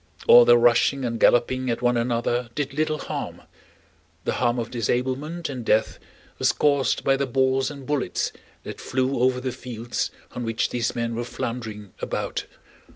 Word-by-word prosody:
All 120 Hz, 0 st, +9 dB
their 120 Hz, 0 st, +7 dB
rushing 120 Hz, +3 st, +3 dB
and 115 Hz, -1 st, -2 dB
galloping 130 Hz, +2 st, +3 dB
at 120 Hz, +1 st, -2 dB
one 120 Hz, 0 st, +3 dB
another 120 Hz, 0 st, 0 dB
did 140 Hz, -2 st, -2 dB
little 155 Hz, +1 st, 0 dB
harm, -, -, -6 dB, 0.8 s
the -, -, -1 dB
harm 120 Hz, 0 st, +2 dB
of 115 Hz, -1 st, -3 dB
disablement 130 Hz, +8 st, -2 dB
and 130 Hz, -4 st, -5 dB
death 110 Hz, 0 st, +1 dB, 0.4 s
was -, -, +3 dB
caused 140 Hz, -2 st, +1 dB
by 135 Hz, -, +3 dB
the 135 Hz, 0 st, -1 dB
balls 130 Hz, +1 st, +1 dB
and 140 Hz, -2 st, -9 dB
bullets 145 Hz, -1 st, -1 dB, 0.3 s
that -, -, -8 dB
flew 130 Hz, 0 st, -1 dB
over 125 Hz, 0 st, +2 dB
the 130 Hz, 0 st, -3 dB
fields 120 Hz, -2 st, -4 dB, 0.2 s
on 125 Hz, -, -5 dB
which 115 Hz, -1 st, -1 dB
these 120 Hz, 0 st, -1 dB
men 115 Hz, 0 st, -2 dB
were 120 Hz, +1 st, -2 dB
floundering 110 Hz, -4 st, -5 dB
about. -, -, -3 dB
125 Hz, 165 wpm, -24 LUFS, 120-135 Hz, 0.8 s, All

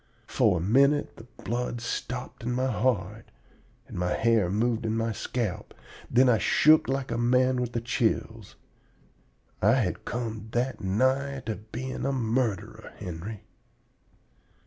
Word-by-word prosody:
For -, -, +2 dB
a -, -, -2 dB
minute 140 Hz, -, +3 dB
the 115 Hz, -, -12 dB, 0.2 s
blood 120 Hz, 0 st, -2 dB
stopped 125 Hz, +1 st, -5 dB
in 120 Hz, +1 st, -2 dB
my 130 Hz, +1 st, 0 dB
heart 105 Hz, -3 st, -1 dB, 0.6 s
and -, -, -7 dB
my 90 Hz, 0 st, 0 dB
hair 115 Hz, -5 st, +2 dB
moved 115 Hz, +4 st, 0 dB
in 110 Hz, 0 st, -1 dB
my 115 Hz, 0 st, 0 dB
scalp; 110 Hz, -1 st, -4 dB, 0.3 s
then 130 Hz, +2 st, +5 dB
I 115 Hz, -4 st, +4 dB
shook 155 Hz, -, +5 dB
like 135 Hz, -2 st, -2 dB
a 115 Hz, -, -1 dB
man 125 Hz, +1 st, +3 dB
with 120 Hz, -1 st, -3 dB
the 115 Hz, -, -1 dB
chills. 115 Hz, -3 st, -1 dB, 1.1 s
I 105 Hz, +5 st, +5 dB
had 110 Hz, -9 st, -1 dB
come 110 Hz, -3 st, -4 dB
that 125 Hz, -1 st, -1 dB
nigh 130 Hz, +8 st, +1 dB, 0.3 s
being 130 Hz, +3 st, -4 dB
a -, -, +1 dB
murderer, 120 Hz, -4 st, -2 dB
Henry! 90 Hz, +5 st, -7 dB
120 Hz, 140 wpm, -27 LUFS, 110-130 Hz, 1.1 s, then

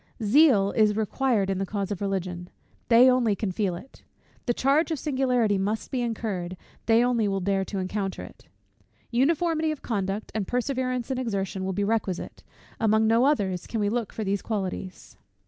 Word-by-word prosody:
Zeal 215 Hz, -4 st, +5 dB
is 215 Hz, -2 st, +3 dB
required 220 Hz, -1 st, 0 dB
in 190 Hz, -, -2 dB
the 195 Hz, -, -1 dB
cause 200 Hz, 0 st, -3 dB
of 200 Hz, -, -4 dB
Religion; 185 Hz, -3 st, -3 dB, 0.4 s
they 240 Hz, +2 st, +7 dB
only 250 Hz, -5 st, +3 dB
can 200 Hz, -1 st, -2 dB
feel 185 Hz, -1 st, -1 dB
it. 245 Hz, +10 st, -12 dB, 0.5 s
The 240 Hz, -, +3 dB
charge 285 Hz, +6 st, +2 dB
of 320 Hz, -, -1 dB
singularity 250 Hz, -8 st, +1 dB
must 210 Hz, +3 st, -2 dB
be 255 Hz, -, -1 dB
incurred; 205 Hz, -6 st, -3 dB, 0.3 s
they 230 Hz, +1 st, +5 dB
only 235 Hz, -4 st, +1 dB
will 195 Hz, -1 st, 0 dB
dare 195 Hz, +1 st, 0 dB
to 200 Hz, -, -5 dB
encounter 195 Hz, +1 st, -3 dB
it. -, -, -14 dB, 0.6 s
Uniformity 315 Hz, +5 st, +1 dB
of 310 Hz, -2 st, -4 dB
conduct, 200 Hz, -2 st, -3 dB
and 215 Hz, -3 st, -2 dB
perseverance 255 Hz, 0 st, -1 dB
in 260 Hz, -, -1 dB
exertion, 195 Hz, -5 st, -2 dB
will 190 Hz, -, -1 dB
be 200 Hz, +2 st, -1 dB
requisite; 200 Hz, -4 st, -2 dB, 0.4 s
among 220 Hz, 0 st, +3 dB
no 230 Hz, +3 st, +4 dB
others 195 Hz, -11 st, 0 dB
can 225 Hz, -, -3 dB
we 205 Hz, -1 st, +1 dB
look 230 Hz, -1 st, -2 dB
for 220 Hz, -, -4 dB
those 195 Hz, -1 st, -1 dB
qualities. 190 Hz, -3 st, -5 dB
215 Hz, 180 wpm, -26 LUFS, 195-250 Hz, 0.6 s, they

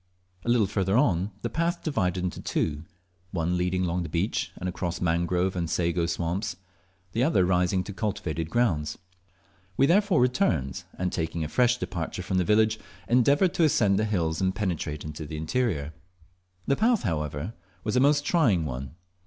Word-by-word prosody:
A -, -, -3 dB
little 120 Hz, -3 st, +4 dB
further 100 Hz, -, +1 dB
the -, -, -1 dB
path 170 Hz, +1 st, -1 dB
divided 90 Hz, -, 0 dB
into 90 Hz, -, -3 dB
two, 75 Hz, 0 st, -2 dB, 0.4 s
one 85 Hz, -1 st, -1 dB
leading 90 Hz, +1 st, 0 dB
along 90 Hz, 0 st, 0 dB
the 85 Hz, -, -4 dB
beach, 90 Hz, +5 st, -1 dB
and 90 Hz, -, -4 dB
across 90 Hz, 0 st, -3 dB
mangrove 90 Hz, +2 st, +1 dB
and 85 Hz, -2 st, -2 dB
sago 85 Hz, 0 st, 0 dB
swamps 85 Hz, +3 st, -2 dB, 0.6 s
the 115 Hz, +5 st, +1 dB
other 115 Hz, -, +3 dB
rising 90 Hz, +1 st, +2 dB
to 100 Hz, -, -7 dB
cultivated 90 Hz, -6 st, -3 dB
grounds. 85 Hz, -10 st, 0 dB, 0.8 s
We 135 Hz, -, +5 dB
therefore 185 Hz, +1 st, +3 dB
returned, 120 Hz, -, +1 dB
and 90 Hz, 0 st, -1 dB
taking 80 Hz, -1 st, -2 dB
a -, -, -2 dB
fresh 125 Hz, +7 st, +3 dB
departure 90 Hz, -3 st, -4 dB
from 95 Hz, 0 st, 0 dB
the -, -, +3 dB
village, 110 Hz, +3 st, +3 dB, 0.3 s
endeavoured 140 Hz, +9 st, +4 dB
to 175 Hz, -, +2 dB
ascend 105 Hz, -10 st, +3 dB
the 110 Hz, -, +1 dB
hills 85 Hz, -6 st, -1 dB
and 95 Hz, 0 st, +1 dB
penetrate 85 Hz, -7 st, -2 dB
into 75 Hz, 0 st, -6 dB
the 75 Hz, -, -6 dB
interior. 80 Hz, -, -1 dB, 0.7 s
The 140 Hz, -, +2 dB
path, 230 Hz, -, +3 dB
however, 75 Hz, 0 st, -2 dB, 0.3 s
was 110 Hz, -, -1 dB
a -, -, +5 dB
most 145 Hz, +2 st, +3 dB
trying 115 Hz, -, +3 dB
one. 65 Hz, +1 st, -5 dB
90 Hz, 170 wpm, -27 LUFS, 85-120 Hz, 0.8 s, We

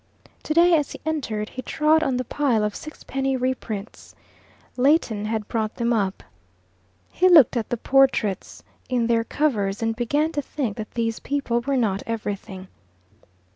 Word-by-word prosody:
Today, 340 Hz, +3 st, +4 dB
as 295 Hz, -3 st, 0 dB
he -, -, -10 dB
entered, 230 Hz, -9 st, -2 dB
he 255 Hz, -, -6 dB
trod 305 Hz, +4 st, +2 dB
on 270 Hz, -5 st, 0 dB
the 255 Hz, -, -1 dB
pile 245 Hz, -5 st, +1 dB
of 210 Hz, 0 st, -2 dB
sixpenny 270 Hz, -3 st, -3 dB
reprints. 245 Hz, -5 st, -4 dB, 0.6 s
Leighton 250 Hz, -6 st, +2 dB
had 215 Hz, -1 st, -2 dB
brought 220 Hz, -1 st, -2 dB
them 235 Hz, 0 st, 0 dB
up. 200 Hz, -4 st, -1 dB, 0.9 s
He 370 Hz, +1 st, +3 dB
looked 305 Hz, -9 st, +7 dB
at 230 Hz, -3 st, -2 dB
the 240 Hz, -, -1 dB
portraits 260 Hz, -6 st, +1 dB, 0.3 s
in 245 Hz, -2 st, +1 dB
their 230 Hz, -1 st, +2 dB
covers, 220 Hz, -7 st, -1 dB
and 225 Hz, 0 st, 0 dB
began 290 Hz, +7 st, 0 dB
to 295 Hz, -3 st, -2 dB
think 260 Hz, -6 st, -3 dB
that 215 Hz, -1 st, -5 dB
these 230 Hz, -1 st, -1 dB
people 275 Hz, -4 st, -1 dB
were 275 Hz, +2 st, -1 dB
not 205 Hz, -5 st, 0 dB
everything. 205 Hz, -4 st, -5 dB
240 Hz, 155 wpm, -23 LUFS, 215-285 Hz, 0.9 s, looked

